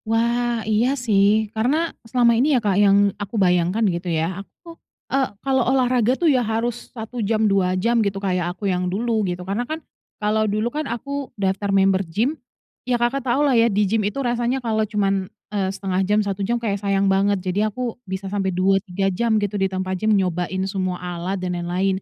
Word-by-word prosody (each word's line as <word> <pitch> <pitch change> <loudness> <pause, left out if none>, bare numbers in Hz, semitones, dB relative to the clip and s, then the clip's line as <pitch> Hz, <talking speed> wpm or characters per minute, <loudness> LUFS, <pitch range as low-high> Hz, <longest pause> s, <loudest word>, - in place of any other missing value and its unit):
Wah 235 0 +1
iya 220 +3 +2 0.2
sih, 210 0 +3
karena 285 +10 0 0.2
selama 240 0 +4
ini 265 +4 +3
ya - - +3
Kak 200 - +3
yang 200 0 +5 0.2
aku 205 +2 -5
bayangkan 180 +3 +2
gitu 175 -2 -1
ya, 165 +3 -1
aku, 335 - -14 0.4
eee, 270 -1 +2 0.2
kalau 265 -1 +2
olahraga 255 -1 +2
tuh 345 - -1
ya 275 -6 +4
harus 230 +1 -2
1 230 0 -6
jam, 215 +1 +1
2, 190 -3 +2
3 230 +6 +1
jam - - +1
gitu, 200 -2 -1
kayak 185 -3 -1
aku 205 - -6
yang 180 0 -1
dulu, 220 +3 0
gitu. 180 0 -5
Karena 200 +5 -2
kan, 315 - -2 0.4
kalau 215 0 +1
dulu 215 +4 -1
kan 300 -1 -3
aku 280 +4 -4
daftar 195 +1 -1
member 195 -1 +3
gym, 205 - -1 0.6
ya 245 - +3
Kakak 240 +3 0
tau 275 +5 +2
lah 280 - +3
ya, 230 -1 +4
di 205 0 +2
gym 215 +3 +1
itu 210 +5 -2
rasanya 240 +1 0
kalau 220 -1 +1
cuman, 195 -3 0 0.2
eee, 195 -2 0
0,5 190 -1 -2
jam, 205 +2 +1
1 200 0 -3
jam 235 +5 0
kayak 205 -4 -2
sayang 200 -1 +1
banget, 195 +1 +2
jadi 205 +4 +1
aku 240 +2 -4 0.2
bisa 190 +1 -4
sampai 195 0 -1
2,3 195 +1 0
jam 225 +3 +1
gitu 205 -2 -1
di 195 - +2
tempat 185 -1 -3
gym, 215 -1 +3
nyobain 185 0 -1
semua 190 -2 -2
alat 180 +2 -4
dan 180 -1 -3
lain-lain. 180 +2 -1
205 Hz, 200 wpm, -22 LUFS, 190-235 Hz, 0.6 s, yang